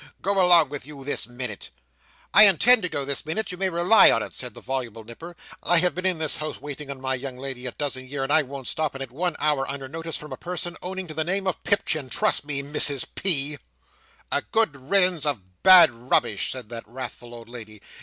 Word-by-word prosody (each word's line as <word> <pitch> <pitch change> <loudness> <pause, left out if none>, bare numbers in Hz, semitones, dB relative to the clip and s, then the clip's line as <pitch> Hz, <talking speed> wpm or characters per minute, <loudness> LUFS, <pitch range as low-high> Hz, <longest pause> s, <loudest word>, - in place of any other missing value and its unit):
Go 195 0 +2
along 175 -3 +5
with 145 -2 -7
you 145 -2 -10
this 140 -5 0
minute!" 120 -4 -6 0.6
"I 210 +1 +10
intend 220 +6 +5
to 180 - -1
go 140 -3 -2
this 140 -1 -2
minute, 180 +7 -3
you 180 - -6
may 190 -1 +1
rely 175 +5 +5
upon - - +4
it," - - -9
said 125 -4 -3
the - - -9
voluble 120 -4 -5
Nipper. 165 +10 -11 0.3
"I 175 - +3
have 175 -1 +3
been 180 +4 -2
in 185 -2 0
this 155 -1 -3
house 155 0 -5
waiting 145 0 -8
on 140 -1 -7
my 130 0 -2
young 130 0 -6
lady 130 -1 -6
a - - -4
dozen 130 -2 -4
year 135 0 -4
and 140 +2 -1
I 160 - +6
won't 135 -1 -8
stop 155 0 -2
in 135 - -5
it 130 - -10
one 170 +5 -2
hour 145 -3 0
under 135 -1 -6
notice 165 +3 -5
from 150 - -9
a - - -7
person 175 0 -4
owning 190 +1 -5
to - - -6
the 160 +1 -1
name 190 +4 -1
of 185 - -3
Pipchin 155 -9 0
trust 145 - 0
me, 140 -2 -1
Mrs 145 -1 -1
P." 150 -6 +1 0.7
"A 145 - +1
good 220 -7 0
riddance 185 -5 +2
of 95 -12 -4
bad 185 -7 +8
rubbish!" 115 -4 -1
said 125 -4 -8
that 115 -2 -8
wrathful 120 0 -8
old 115 -1 -11
lady. 110 -3 -10
145 Hz, 230 wpm, -24 LUFS, 130-175 Hz, 0.7 s, I